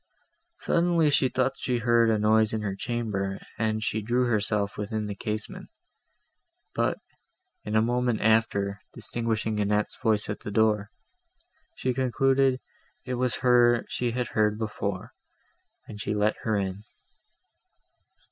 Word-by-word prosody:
Suddenly, 170 -3 +2
she 135 -2 +3
thought 130 +1 -1
she 125 -2 -1
heard 120 -1 +3
a 110 - +3
noise 110 +1 +3
in 110 -1 -2
her 100 -2 -2
chamber, 100 -4 -3 0.2
and 110 -1 0
she 110 +1 -1
drew 120 +4 +1
herself 105 -3 0
within 105 +1 -3
the 105 - -4
casement; 105 +2 -5 1.0
but, - - 0 0.7
in 105 - -2
a 110 - +4
moment 120 -1 0
after, 105 -2 +1
distinguishing 110 -2 -2
Annette's 105 +1 0
voice 110 -4 +2
at 105 - -4
the - - -7
door, 105 0 +2 0.9
she 130 - -1
concluded 130 +1 +2 0.5
it 130 - -3
was 125 0 0
her 120 -1 +5
she 125 - -1
had 120 +1 -2
heard 105 -1 +1
before, 110 -1 -4 0.8
and 105 -1 -8
she 105 - -2
let 105 +1 +2
her 110 -2 0
in. 95 +1 -3
110 Hz, 140 wpm, -27 LUFS, 105-120 Hz, 1.0 s, her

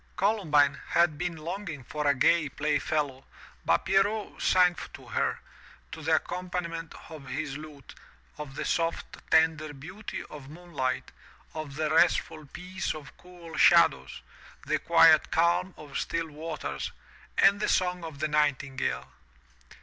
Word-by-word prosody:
Columbine 155 -9 +2
had 170 -2 +3
been 175 -2 -3
longing 160 -2 -6
for 150 +4 -3
a 140 - +4
gay 155 +3 +3
play 145 +1 0
fellow, 140 -4 -2 0.4
but 85 - +2
Pierrot 205 +2 +1
sang 180 -1 +4 0.2
to - - -14
her, - - 0 0.5
to 160 - -7
the 160 +1 +3
accompaniment 175 -1 -4
of 155 -4 -10
his 135 +1 -4
lute, 150 -2 -10 0.5
of 145 -2 -7
the - - -3
soft, 165 0 -1
tender 160 -2 +3
beauty 180 +10 -7
of 140 -2 -11
moon 175 +3 -13
light, 130 -2 -2 0.4
of 155 -3 -6
the 155 0 -1
restful 160 -2 +2
peace 185 +3 -4
of 150 -1 -11
cool 175 -2 -12
shadows, - - +4 0.4
the - - 0
quiet 165 -2 +6
calm 170 +2 +2
of 145 -2 -6
still 165 -1 -2
waters, 150 - -5 0.5
and 200 +1 +5
the - - 0
song 180 -1 +1
of 160 -3 -7
the 155 - -1
nightingale. 145 -3 0
160 Hz, 140 wpm, -28 LUFS, 145-175 Hz, 0.5 s, quiet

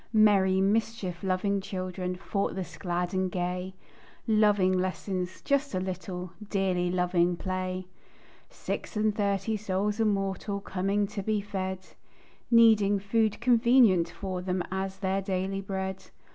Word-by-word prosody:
Merry, 195 -3 +5
mischief 200 -3 0
loving 195 +1 0
children, 185 -1 -4
Thoughtless, 190 -1 -3
glad 175 -1 -2
and 185 -1 0
gay, 180 +1 -3 0.5
Loving 210 -4 +4
lessons 185 0 -2
"just 280 -5 0
a - - +1
little," 185 -1 -5 0.2
Dearly 185 -3 +1
loving 180 -1 +1
play. 185 0 -3 0.6
Six - - -5
and 215 -1 +1
thirty 200 0 0
souls 205 +1 -1
immortal, 200 -1 0
Coming 195 +1 0
to 200 0 -5
be 215 +2 0
fed; 190 -2 -4 0.6
Needing 220 -4 +6
"food 215 +2 0
convenient 235 -7 +5
for 185 -1 -5
them," 180 -1 -1
As 190 0 -3
their 190 0 0
daily 195 0 -2
bread. 190 -1 -4
190 Hz, 125 wpm, -28 LUFS, 185-205 Hz, 0.6 s, Needing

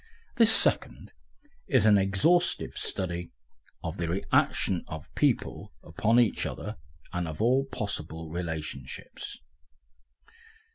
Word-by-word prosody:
This 230 -1 +6
second - - +3 0.6
is 130 -6 +3
an 105 -2 +6
exhaustive 150 - +2
study 90 -2 -3 0.5
of - - -4
the 85 -1 -2
reaction 85 +1 +1
of 80 -3 -9
people - - 0
upon 110 +9 +2
each 120 -4 +2
other 105 - -6 0.4
and 90 -1 -2
of 80 -1 -6
all 130 +5 +3
possible 80 - -4
relationships. 80 -6 -6
95 Hz, 105 wpm, -28 LUFS, 80-115 Hz, 0.6 s, This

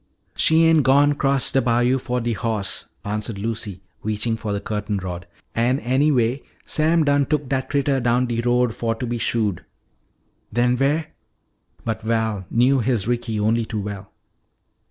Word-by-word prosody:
"She 160 +1 +4
ain' 165 -1 +5
gone 140 +2 +4
'cross 140 -2 +2
de 135 - +3
bayo' 120 +2 +2
fo' 125 0 -2
de 120 0 -1
hoss," 110 -3 -2 0.2
answered 105 +1 -3
Lucy, 105 -3 -4 0.2
reaching 110 +2 -1
for 110 -2 -4
the 100 - -1
curtain 105 0 -3
rod. 90 -2 -6 0.3
"An' 120 +3 +2
anyway, 130 -1 +1 0.2
Sam 160 +1 +2
done 145 -2 +2
took 150 -2 0
dat 130 0 -2
critter 140 -1 +1
down 120 +1 +2
de 120 -1 -1
road 120 -1 +2
fo' 115 0 -2
to 120 - -4
be 120 0 -3
shoed." 105 -6 0 0.9
"Then 120 +2 +2
where 145 +5 0 0.4
" - - -35
But 110 -1 -2
Val 110 -4 -1
knew 130 +3 +3
his 115 -4 0
Ricky 120 -2 -1
only 110 +2 +2
too 110 -2 -4
well. 100 -1 -7
120 Hz, 165 wpm, -22 LUFS, 110-135 Hz, 0.9 s, ain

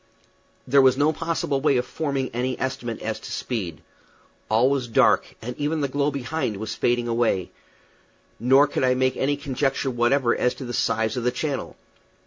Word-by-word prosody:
There 140 +2 +5
was 130 -1 +4
no 150 +2 +3
possible 160 -4 -1
way 140 -2 +3
of 125 - 0
forming 140 -2 -2
any 125 +2 -2
estimate 130 -3 -4
as 110 0 -3
to - - -9
speed. 95 - -4 0.7
All 115 +4 +4
was 135 -2 0
dark, 115 - +3
and 125 +2 -5
even 150 +2 -1
the 140 - +1
glow 140 +2 0
behind 135 -4 -3
was 110 +2 -4
fading 120 0 0
away; 115 -6 0 0.9
nor 135 +5 +5
could 145 - -2
I 125 0 +3
make 130 0 +1
any 145 +1 0
conjecture 135 -1 -1
whatever 120 +1 +2
as 125 - 0
to 135 - -7
the 120 - -5
size 110 +1 0
of 125 - -2
the 125 - +3
channel. 140 +2 -3
130 Hz, 180 wpm, -24 LUFS, 120-140 Hz, 0.9 s, There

